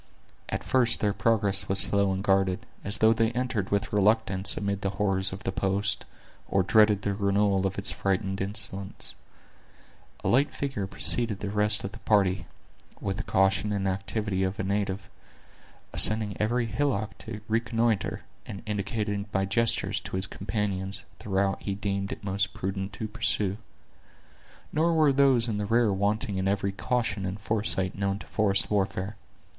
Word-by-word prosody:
At - - -3
first 120 -3 +3
their 105 -1 +1
progress 100 -1 +1
was 95 0 +4
slow 100 0 +5
and 95 0 -2
guarded, 95 -2 +1 0.2
as 100 +2 -2
though 110 +1 +5
they 115 0 +1
entered 120 -5 -2
with 100 0 -1
reluctance 105 -2 +2
amid 100 -1 -2
the 100 - -1
horrors 95 -2 0
of 95 +1 -8
the 95 - -2
post, 100 +2 -1 0.4
or 95 - +2
dreaded 105 0 +4
the 100 - 0
renewal 100 -1 +1
of 95 - -6
its 100 +1 +1
frightful 95 0 -1
incidents. 100 -1 -2 1.1
A - - -1
light 140 +4 +2
figure 135 -9 -3
preceded 110 +1 +6
the 100 - -4
rest 105 0 +2
of 100 - -4
the 110 - -12
party, 95 -4 +1 0.5
with 95 -1 -3
the - - -1
caution 95 +2 +1
and 100 -1 -1
activity 100 +1 -2
of 95 +1 -2
a - - -1
native; 100 0 -2 0.9
ascending 110 -2 +3
every 120 +3 +1
hillock 115 -3 -1
to 110 -2 -7
reconnoiter, 115 -2 0 0.3
and 100 - -8
indicating 105 0 -3
by 95 0 0
gestures, 105 -1 0
to - - -7
his 95 +1 0
companions, 100 -1 -3
the 110 - -10
route 95 0 0
he 100 - -3
deemed 100 -1 -3
it - - -7
most 100 0 -1
prudent 95 +1 -4
to 110 +2 -4
pursue. 105 -3 0 1.2
Nor 165 +2 +2
were 155 -3 +4
those 135 -4 +4
in 105 -3 -2
the 105 - -2
rear 115 -1 +3
wanting 100 0 -1
in 95 - -1
every 100 0 0
caution 110 0 -2
and 95 +2 -4
foresight 105 -3 0
known 100 0 -1
to - - -11
forest 105 -1 0
warfare. 100 0 -1
100 Hz, 165 wpm, -27 LUFS, 95-110 Hz, 1.2 s, preceded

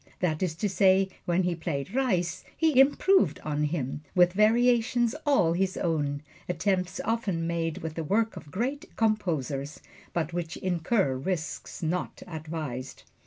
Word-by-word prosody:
That 160 -4 0
is 175 -4 0
to 205 - -1
say, 190 0 +4 0.2
when 175 +1 +2
he 180 0 +1
played 160 -3 -4
"Reis," 185 -10 0
he 315 -5 +3
improved 270 - +4
on 150 0 0
him, 145 -3 -2
with 180 -1 +5
variations 235 +2 +3
all 180 - +4
his 190 +2 0
own 145 -4 -1 0.3
attempts 180 0 0
often 205 -7 -1
made 165 -1 -1
with 160 -1 -4
the 165 - -3
work 220 +8 +1
of 150 - -10
great 265 - -2
composers, 155 - -1 0.3
but 170 -1 -2
which 175 -1 -3
incur 180 - +1
risks 160 +5 -4
not 175 +3 -2
advised. 155 -6 -6
175 Hz, 145 wpm, -28 LUFS, 155-215 Hz, 0.3 s, with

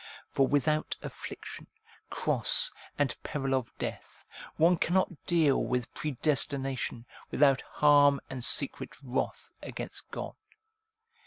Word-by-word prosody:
For 135 - +2
without 150 +2 0
affliction, - - -8 0.4
cross, - - +3 0.3
and 145 -4 0
peril 135 -3 -3
of 130 -3 -1
death, - - -7 0.3
one 170 +2 +4
cannot 175 -1 -1
deal 160 -6 +3
with 125 -1 -2
predestination, 135 -4 -1 0.2
without 140 -2 +3
harm 145 -1 +4
and 130 -2 -6
secret 140 +2 +2
wrath 125 -1 -3
against - - -7
God. - - -6
140 Hz, 105 wpm, -29 LUFS, 130-150 Hz, 0.4 s, one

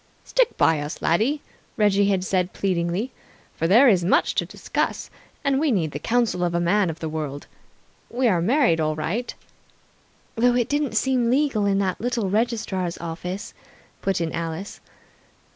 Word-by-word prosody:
"Stick - - +1
by 160 -2 +3
us, 145 +1 -5
laddie," 235 - +1 0.4
Reggie 205 -1 +3
had 190 -2 +1
said 185 -1 0
pleadingly, 185 +5 -1 0.4
"for 165 - 0
there 235 +10 +6
is 190 -7 +4
much 175 - +2
to - - -1
discuss, - - -3 0.3
and 275 -1 +2
we 305 -1 +2
need 165 -9 0
the 145 - -5
counsel 230 -3 0
of 170 -1 0
a - - +2
man 185 +2 +2
of 165 0 -6
the 160 - -4
world. 150 -2 -5 0.6
We 250 +1 +1
are 180 -6 +2
married 235 - +3
all 155 -1 0
right 190 +11 -2 0.5
" - - -36
"Though 245 +1 +3
it 245 -2 +1
didn't 290 -6 0
seem 250 0 +2
legal 255 -6 +2
in 195 -1 +2
that 190 -2 -1
little 235 -5 -1
registrar's 210 -6 -1
office," 175 +3 -6 0.5
put 195 -2 0
in 165 -1 -2
Alice. 165 +4 -5
195 Hz, 170 wpm, -23 LUFS, 170-240 Hz, 0.6 s, there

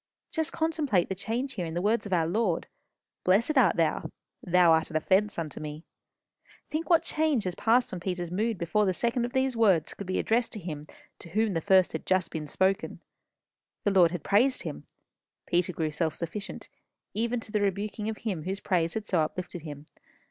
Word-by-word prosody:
Just 320 0 -1
contemplate 310 - +1
the - - 0
change 235 +7 -3
here 180 -7 -3
in 160 - -6
the - - 0
words 215 +1 +1
of - - -10
our 170 -3 +3
Lord. 180 0 0 0.6
'Blessed 215 +11 +3
art 235 -11 +5
thou.' 160 -1 0 0.3
'Thou 180 -1 +4
art 160 -1 +3
an 160 - -9
offence 195 +6 +2
unto 160 -3 -4
me.' 150 +1 -7 0.8
Think 315 +3 -3
what 335 -2 +5
change 305 -7 +1
has 185 - -2
passed 230 +5 +2
on 180 - -3
Peter's 175 -1 -3
mood 215 +3 0
before 195 +4 +1
the 185 - +1
second 235 +3 +1
of 245 - -6
these 260 -1 +1
words 195 -9 +3
could 200 - -8
be 185 - -1
addressed 230 +1 +1
to 215 - -5
him 155 -5 -6 0.3
to 170 - -10
whom 215 +3 +1
the 165 - -1
first 190 -1 +4
had - - -6
just 185 -2 +2
been 155 -2 -4
spoken. 190 +6 0 0.8
The 205 - +2
Lord 180 -3 +6
had 175 -3 -5
praised 245 +7 +3
him. - - -7 0.6
Peter 175 +1 +1
grew 160 -2 -2
self 160 0 -1
sufficient, 175 +5 -6 0.5
even 235 +3 0
to 225 - -8
the 210 - +1
rebuking 205 +2 -1
of 220 - -4
him 200 -8 -3
whose 195 +2 -2
praise 170 -5 0
had 220 -1 -3
so 180 -6 +1
uplifted 175 +2 -4
him. 150 -1 -8
190 Hz, 200 wpm, -28 LUFS, 170-225 Hz, 0.8 s, Lord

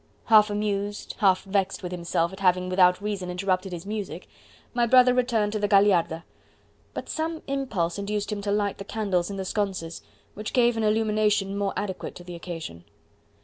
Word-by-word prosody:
Half 215 -2 +6
amused, 205 0 -2
half 190 -2 +3
vexed 195 -1 -1
with 180 - -4
himself 170 0 -1
at 190 - -9
having 180 -1 +2
without 185 +1 +4
reason 200 -4 -3
interrupted 185 +1 -1
his 175 0 -6
music, 210 -1 -5 0.5
my 240 -1 +2
brother 250 +1 +6
returned 235 -4 +1
to 215 - -1
the 205 - +1
Gagliarda; 195 -5 +3 0.7
but - - -5
some 320 0 -3
impulse 225 -11 -2
induced 205 +1 -2
him 205 -1 -3
to 200 0 -2
light 205 -1 0
the - - -5
candles 195 -4 -1
in 200 - -5
the 190 - -3
sconces, 185 -5 -3 0.3
which 210 +1 -6
gave 240 -2 +4
an 225 - -1
illumination 210 -2 +1
more 200 -1 -1
adequate 200 -2 -4
to 175 - -10
the 175 0 -9
occasion. 165 - -7
200 Hz, 180 wpm, -26 LUFS, 185-215 Hz, 0.7 s, Half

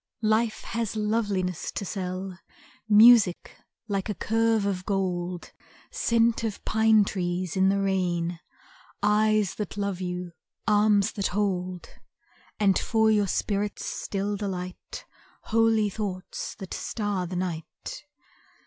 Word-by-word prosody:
Life 220 +1 +1
has 230 -2 -3
loveliness 205 -5 -1
to 200 - -3
sell, 185 -1 -4 0.5
Music 215 -3 +6 0.3
like 200 -1 -2
a 210 - -2
curve 225 +2 +1
of 190 -2 -1
gold, 180 -3 -2 0.4
Scent 235 - +2
of 220 -3 -4
pine 220 -1 +4
trees 180 -2 -2
in 190 0 +4
the 200 0 +2
rain, 175 -3 0 0.6
Eyes 210 -1 +3
that 210 -1 -5
love 200 -2 -2
you, 180 -1 -4 0.4
arms 210 0 +4
that 200 - -1
hold, 185 -3 -2 0.7
And 200 -3 +3
for 220 -1 +2
your 205 -2 +3
spirit's 205 +2 -1
still 200 +1 -3
delight, 190 - -6 0.4
Holy 225 -1 +3
thoughts 195 -3 -5
that 190 - -8
star 205 -5 -2
the 180 - -6
night. 175 - -5
200 Hz, 120 wpm, -26 LUFS, 185-215 Hz, 0.7 s, Music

